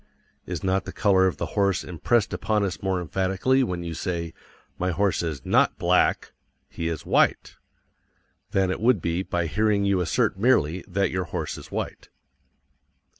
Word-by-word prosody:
Is -, -, -4 dB
not 95 Hz, 0 st, 0 dB
the -, -, -6 dB
color 95 Hz, -3 st, +3 dB
of 90 Hz, -, -2 dB
the -, -, -2 dB
horse 100 Hz, -1 st, +1 dB
impressed 100 Hz, +6 st, 0 dB
upon 105 Hz, -1 st, 0 dB
us 95 Hz, -3 st, -3 dB
more 95 Hz, -1 st, 0 dB
emphatically 95 Hz, -, +1 dB
when 90 Hz, -7 st, -3 dB
you 85 Hz, -1 st, -5 dB
say, 85 Hz, 0 st, -3 dB, 0.5 s
"My 90 Hz, -, 0 dB
horse 95 Hz, +2 st, +1 dB
is 80 Hz, -6 st, -4 dB
NOT -, -, +3 dB
BLACK. -, -, +2 dB, 0.4 s
He 85 Hz, -, -4 dB
is 80 Hz, -3 st, -4 dB
WHITE" -, -, +1 dB, 0.9 s
than 95 Hz, -1 st, +1 dB
it 95 Hz, -, -4 dB
would 120 Hz, -2 st, +4 dB
be 85 Hz, +2 st, -1 dB
by 85 Hz, -2 st, -2 dB
hearing 105 Hz, +3 st, +1 dB
you 100 Hz, -2 st, +2 dB
assert 90 Hz, +2 st, 0 dB
merely 95 Hz, -, +2 dB
that 100 Hz, +2 st, 0 dB
your 90 Hz, 0 st, -2 dB
horse -, -, -4 dB
is -, -, -11 dB
white? -, -, -5 dB
95 Hz, 170 wpm, -25 LUFS, 85-100 Hz, 0.9 s, would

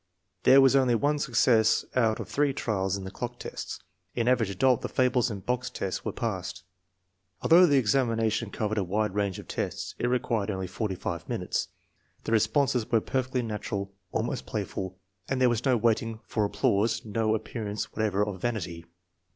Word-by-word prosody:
There 135 Hz, +1 st, +8 dB
was 135 Hz, 0 st, +5 dB
only 130 Hz, -3 st, +4 dB
one 145 Hz, +5 st, +1 dB
success 120 Hz, -5 st, +3 dB
out 115 Hz, -3 st, +2 dB
of -, -, -5 dB
three 145 Hz, -1 st, +1 dB
trials 100 Hz, -7 st, -1 dB
in 100 Hz, -, -7 dB
the 95 Hz, -, -6 dB
clock 120 Hz, +3 st, -5 dB
test. -, -, -7 dB, 0.3 s
In 120 Hz, -1 st, 0 dB
Average 120 Hz, -5 st, +3 dB
Adult 120 Hz, +6 st, +2 dB
the -, -, -4 dB
fables 125 Hz, -1 st, +2 dB
and 100 Hz, -4 st, -7 dB
box 125 Hz, 0 st, -1 dB
test 95 Hz, -1 st, -4 dB
were -, -, -2 dB
passed. 95 Hz, -5 st, -4 dB, 0.8 s
Although 175 Hz, +2 st, +7 dB
the 145 Hz, -3 st, +4 dB
examination 115 Hz, -3 st, +1 dB
cov 105 Hz, 0 st, -2 dB
ered 110 Hz, -, -1 dB
a -, -, +1 dB
wide 105 Hz, +2 st, -1 dB
range 100 Hz, -2 st, -1 dB
of -, -, -10 dB
tests, -, -, -3 dB
it 120 Hz, -, +1 dB
required 115 Hz, -4 st, 0 dB
only 95 Hz, -2 st, -2 dB
45 95 Hz, -4 st, -4 dB
minutes. -, -, -1 dB, 0.6 s
The -, -, -4 dB
responses 115 Hz, +2 st, +2 dB
were 115 Hz, -, +5 dB
perfectly 130 Hz, +2 st, -1 dB
natural, 100 Hz, -3 st, -4 dB, 0.2 s
almost -, -, -2 dB
playful. 95 Hz, 0 st, -4 dB, 0.3 s
There 130 Hz, -2 st, +3 dB
was 120 Hz, +1 st, -1 dB
no 130 Hz, -2 st, +4 dB
waiting 115 Hz, 0 st, 0 dB
for 105 Hz, -2 st, 0 dB
applause, 100 Hz, +2 st, +1 dB
no 110 Hz, 0 st, +1 dB
appearance 110 Hz, -1 st, -4 dB
whatever 105 Hz, -2 st, +1 dB
of 95 Hz, -3 st, -6 dB
vanity. 85 Hz, -8 st, -3 dB
110 Hz, 175 wpm, -28 LUFS, 100-125 Hz, 0.8 s, There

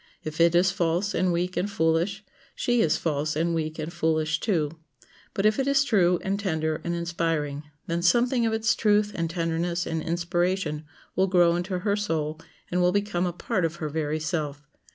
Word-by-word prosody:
If 155 Hz, +1 st, -3 dB
it 170 Hz, 0 st, +5 dB
is 180 Hz, +1 st, +4 dB
false 180 Hz, +2 st, 0 dB
and 185 Hz, -1 st, +1 dB
weak 180 Hz, +2 st, -1 dB
and 180 Hz, +4 st, 0 dB
foolish, 170 Hz, +3 st, 0 dB, 0.3 s
she 240 Hz, -1 st, +1 dB
is 160 Hz, -, +2 dB
false 155 Hz, -1 st, -1 dB
and 165 Hz, +2 st, 0 dB
weak 155 Hz, -1 st, -2 dB
and 160 Hz, +2 st, -5 dB
foolish 160 Hz, -2 st, 0 dB
too; 165 Hz, -6 st, -1 dB, 0.6 s
but 200 Hz, -1 st, 0 dB
if 215 Hz, +3 st, +3 dB
it 270 Hz, -, 0 dB
is 280 Hz, 0 st, +4 dB
true 185 Hz, -9 st, +3 dB
and 195 Hz, +1 st, -1 dB
tender 160 Hz, -5 st, -1 dB
and 170 Hz, 0 st, -2 dB
inspiring, 165 Hz, -4 st, -2 dB, 0.2 s
then 170 Hz, 0 st, -2 dB
something 240 Hz, +6 st, +3 dB
of -, -, 0 dB
its 220 Hz, 0 st, +2 dB
truth 210 Hz, -1 st, +2 dB
and 165 Hz, -1 st, -2 dB
tenderness 170 Hz, +1 st, -1 dB
and 160 Hz, -1 st, -2 dB
inspiration 175 Hz, -1 st, -1 dB, 0.3 s
will 190 Hz, +1 st, +3 dB
grow 175 Hz, -2 st, +4 dB
into 180 Hz, +2 st, -2 dB
her 200 Hz, +2 st, 0 dB
soul, 160 Hz, -6 st, -2 dB, 0.3 s
and 180 Hz, 0 st, +1 dB
will 180 Hz, 0 st, +4 dB
become 200 Hz, -2 st, 0 dB
a -, -, -1 dB
part 180 Hz, +1 st, -2 dB
of 165 Hz, 0 st, -1 dB
her 155 Hz, -3 st, -4 dB
very 155 Hz, 0 st, -2 dB
self. 155 Hz, -3 st, -3 dB
170 Hz, 195 wpm, -26 LUFS, 160-190 Hz, 0.6 s, it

